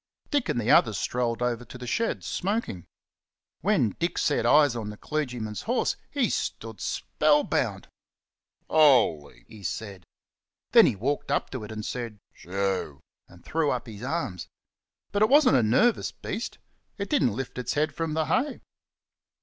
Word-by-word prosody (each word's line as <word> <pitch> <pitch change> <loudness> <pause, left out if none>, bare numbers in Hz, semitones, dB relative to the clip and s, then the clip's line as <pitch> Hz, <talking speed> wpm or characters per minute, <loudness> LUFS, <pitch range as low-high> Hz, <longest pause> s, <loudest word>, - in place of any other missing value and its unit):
Dick 285 - +1
and 145 - 0
the 115 0 +1
others 110 -3 +5
strolled 120 -1 -1
over 120 -1 -1
to 125 - -11
the 125 - -8
shed, 225 - -1
smoking. 195 - -3 0.7
When 180 - +2
Dick 170 +1 -1
set 145 - +1
eyes 145 -4 +5
on 110 -3 -4
the 105 - -8
clergyman's 125 -9 -3
horse - - 0
he - - +1
stood 110 -4 -4
spell - - +2
bound! - - -1 0.8
"Holy!" 125 - +3
he 110 - -13
said. 95 0 -5 0.7
Then - - +8
he - - +1
walked 135 +9 -2
up - - 0
to 130 -5 -5
it 105 - -10
and 110 -1 -5
said 115 -4 -5 0.2
"Shoo!" 95 -6 -3 0.3
and 85 - -18
threw 160 -2 0
up 125 -3 -2
his 110 -3 -10
arms. 130 - -3 0.6
But 205 - -1
it 215 - +5
wasn't 280 - +6
a - - +4
nervous 195 - +2
beast; 225 +5 -5 0.4
it 200 -1 -3
didn't 125 - +2
lift 130 0 -5
its 125 - -2
head 150 +2 +1
from 165 -2 -3
the 160 -1 +1
hay. 265 - 0
125 Hz, 165 wpm, -27 LUFS, 110-160 Hz, 0.8 s, Then